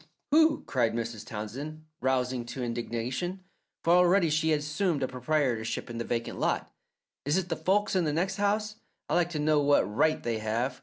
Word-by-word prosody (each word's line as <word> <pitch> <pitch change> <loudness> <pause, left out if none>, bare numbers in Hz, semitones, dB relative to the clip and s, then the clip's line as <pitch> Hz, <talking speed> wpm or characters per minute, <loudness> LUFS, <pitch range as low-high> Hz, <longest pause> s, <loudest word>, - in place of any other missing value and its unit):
"Who?" 315 0 +4
cried 120 -4 +1
Mrs. 115 -2 -4
Townsend, 135 +8 -6
rousing 130 -1 0
to 120 +2 -5
indignation, 120 +9 -3 0.4
for 170 - +4
already 180 -1 +5
she 160 +1 +2
had 150 -2 +2
assumed 150 0 0
a - - +1
proprietorship 125 -4 -1
in 115 - -5
the - - -1
vacant 115 0 -3
lot. - - -1 0.5
"Is 145 +5 +1
it 185 -2 -1
the 165 - 0
folks 190 +6 +1
in 180 -3 +2
the 150 - +1
next 185 +6 -1
house? 210 +1 0 0.3
I'd - - 0
like 175 -1 +3
to 170 - -4
know 150 0 +3
what 145 0 +4
right 110 +11 +1
they 115 -2 -1
have! 115 +4 -1
145 Hz, 190 wpm, -29 LUFS, 120-175 Hz, 0.5 s, already